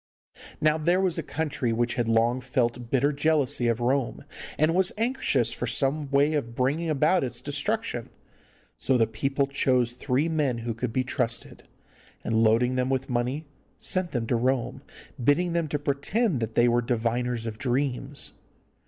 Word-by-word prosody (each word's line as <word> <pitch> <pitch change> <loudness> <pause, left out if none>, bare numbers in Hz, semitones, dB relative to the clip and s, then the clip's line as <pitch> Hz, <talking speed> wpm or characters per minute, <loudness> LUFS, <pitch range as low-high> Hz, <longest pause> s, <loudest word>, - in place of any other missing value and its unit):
Now 155 +1 +2
there 175 +4 +2
was 185 -3 +1
a 160 - -8 0.3
country 120 -3 +2
which 120 +1 0
had 120 -2 -1
long 115 +3 +2
felt 125 -2 -1
bitter 140 +3 +2
jealousy 145 -4 +1
of 115 0 +1
Rome, 130 +1 -1 0.3
and 155 +2 +3
was 185 +1 +3
anxious 225 - +1
for 125 - -3
some 140 +5 +1
way 140 +2 +3
of 115 -6 -2
bringing 145 +7 0
about 155 +4 +3
its 120 -2 -4
destruction. 145 - -2 0.7
So 130 - +2
the 115 - +4
people 135 +6 -1
chose 130 -3 +1
three 130 +4 0
men 150 -7 0
who 115 - -1
could 115 +1 -3
be 130 +3 0
trusted, 125 -2 -3 0.6
and, 115 - -1
loading 115 +3 +3
them 130 0 0
with 135 0 -1
money, 125 +6 -1 0.3
sent 185 -1 0
them 120 -6 -2
to 120 - 0
Rome, 125 +1 0 0.4
bidding 165 +7 +2
them 170 -2 0
to 150 - -1
pretend 145 - 0
that 115 -1 -4
they 120 - +5
were 120 0 +3
diviners 120 0 -1
of 110 -1 -5
dreams. 135 +2 -2
130 Hz, 170 wpm, -26 LUFS, 120-150 Hz, 0.7 s, they